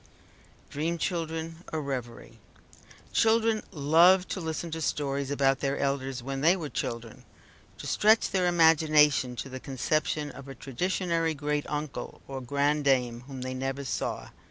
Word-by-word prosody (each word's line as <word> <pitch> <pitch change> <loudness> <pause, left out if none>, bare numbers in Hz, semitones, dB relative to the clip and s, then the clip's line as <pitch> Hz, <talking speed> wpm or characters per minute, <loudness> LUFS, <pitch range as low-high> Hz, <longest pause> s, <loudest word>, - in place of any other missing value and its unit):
DREAM 165 +4 -1
CHILDREN 165 -1 -3
A 160 - -1
REVERIE 130 -5 -6 0.7
Children 225 -1 +3
love 170 +4 +5
to - - -3
listen 160 +1 -4
to 160 0 -4
stories 140 -2 -1
about 135 -1 +2
their 140 0 -1
elders, 135 -2 -2
when 135 +1 -4
they 165 +5 +5
were 160 -6 -5
children; 115 -4 -5 0.5
to - - -9
stretch 220 +2 +3
their 185 -2 +2
imagination 155 -6 +4
to 130 - -5
the 130 0 -7
conception 150 +3 -1
of 135 0 -11
a 135 - -8
traditionary 165 +4 -1
great 150 0 -2
uncle, 150 -2 -5
or 135 -1 -5
grandame, 135 -3 +1
whom 135 -2 -7
they 130 0 -4
never 135 +2 -3
saw. - - -3
145 Hz, 145 wpm, -28 LUFS, 135-165 Hz, 0.7 s, love